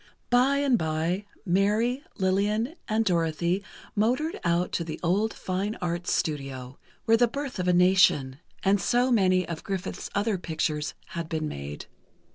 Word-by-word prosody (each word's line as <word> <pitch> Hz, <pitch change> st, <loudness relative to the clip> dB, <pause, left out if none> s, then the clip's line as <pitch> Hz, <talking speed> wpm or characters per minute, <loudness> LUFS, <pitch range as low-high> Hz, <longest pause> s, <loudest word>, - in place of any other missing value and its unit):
By 255 Hz, +3 st, +4 dB
and 275 Hz, -4 st, +2 dB
by, 160 Hz, +5 st, -1 dB, 0.2 s
Mary, 210 Hz, +8 st, +2 dB, 0.2 s
Lillian 205 Hz, +7 st, +1 dB
and 220 Hz, +1 st, +1 dB
Dorothy, 170 Hz, +1 st, +1 dB, 0.3 s
motored 255 Hz, +10 st, +1 dB
out 170 Hz, +1 st, +1 dB
to 170 Hz, -, -1 dB
the 160 Hz, -1 st, -6 dB
old 200 Hz, +6 st, +2 dB
Fine 195 Hz, +4 st, -3 dB
Arts 175 Hz, 0 st, -2 dB
Studio, 135 Hz, -4 st, -3 dB, 0.3 s
where 225 Hz, 0 st, +5 dB
"The 240 Hz, +1 st, +4 dB
Birth 275 Hz, -2 st, -5 dB
of 180 Hz, -, -1 dB
a 180 Hz, -, +4 dB
Nation" 175 Hz, -7 st, +4 dB, 0.2 s
and 195 Hz, 0 st, +3 dB
so 245 Hz, +1 st, +2 dB
many 185 Hz, -5 st, +3 dB
of 165 Hz, -2 st, -5 dB
Griffith's 195 Hz, -2 st, -4 dB
other 205 Hz, -1 st, +1 dB
pictures, 155 Hz, -3 st, -2 dB
had 170 Hz, -1 st, -5 dB
been 155 Hz, -1 st, -2 dB
made. 70 Hz, -, -6 dB
185 Hz, 150 wpm, -27 LUFS, 165-220 Hz, 0.3 s, where